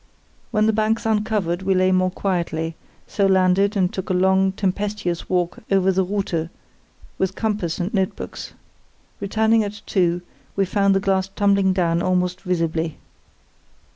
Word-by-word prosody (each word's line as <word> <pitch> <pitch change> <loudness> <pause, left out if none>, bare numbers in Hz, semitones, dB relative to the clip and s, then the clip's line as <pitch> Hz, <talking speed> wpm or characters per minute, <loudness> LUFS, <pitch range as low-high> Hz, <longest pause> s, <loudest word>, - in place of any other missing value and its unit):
"When 215 -2 +2
the 220 - +3
banks 220 +1 0
uncovered 210 -5 0
we 190 0 +1
lay 185 0 +3
more 185 0 +3
quietly, 170 -4 -2 0.3
so 200 -2 +1
landed 190 +2 +3
and 185 -1 +1
took 190 - -5
a 185 - +1
long, 190 +1 +3
tempestuous 195 -2 -2
walk 180 -2 0
over 190 -1 +3
the 190 0 +1
Rute, 180 -4 -2 0.7
with 190 +1 0
compass 205 -7 -1
and 180 +3 -3
notebooks. 190 -3 -3 0.7
Returning 220 +2 +2
at 210 +1 -6
two, 175 -2 +1 0.3
we 195 - +2
found 200 +1 +2
the - - +3
glass 190 -1 +1
tumbling 200 -1 +2
down 170 -2 +1
almost 180 0 0
visibly. 165 -3 -1
190 Hz, 145 wpm, -22 LUFS, 180-200 Hz, 0.7 s, the